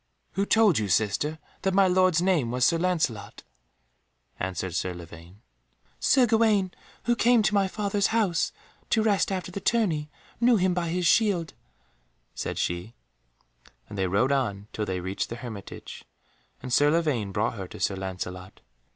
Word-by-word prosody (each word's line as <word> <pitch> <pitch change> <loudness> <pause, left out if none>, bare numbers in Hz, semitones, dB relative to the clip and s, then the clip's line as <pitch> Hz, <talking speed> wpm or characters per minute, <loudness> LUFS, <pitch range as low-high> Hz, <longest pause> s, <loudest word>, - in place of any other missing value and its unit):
"Who 200 +1 -1
told 215 - +4
you, 105 -2 -2
sister, 110 - +1 0.2
that 190 -1 0
my 195 -1 +5
lord's 185 -2 +3
name 175 -10 +2
was 125 +1 +1
Sir 165 - +3
Lancelot?" 155 - -1 1.0
answered 95 -1 -3
Sir 90 +2 -2
Lavaine. 85 +3 -12 0.6
"Sir 260 -2 +4
Gawaine, 220 -5 +2 0.3
who 240 +1 +2
came 235 -1 +4
to 210 - +1
my 200 -1 +3
father's 200 0 0
house 215 -7 +1 0.4
to 220 - +2
rest 205 -3 +2
after 185 -1 -3
the 200 - -5
tourney, 185 -9 0 0.3
knew 240 0 +5
him 185 -3 +2
by 175 -2 -1
his 180 +1 -1
shield," 180 -3 +2 0.8
said - - -4
she, 90 +7 -3 0.9
and - - -9
they 95 -1 0
rode 105 +9 +2
on 105 -7 -1
till 105 - -2
they 95 -1 -2
reached 95 +2 -3
the 120 - -5
hermitage, 115 -5 -9 0.6
and 125 -1 -4
Sir 145 +4 +5
Lavaine 150 -11 0
brought 105 +2 0
her 95 -5 -6
to - - -11
Sir 100 - 0
Lancelot. 95 -1 -6
155 Hz, 160 wpm, -26 LUFS, -, 1.0 s, my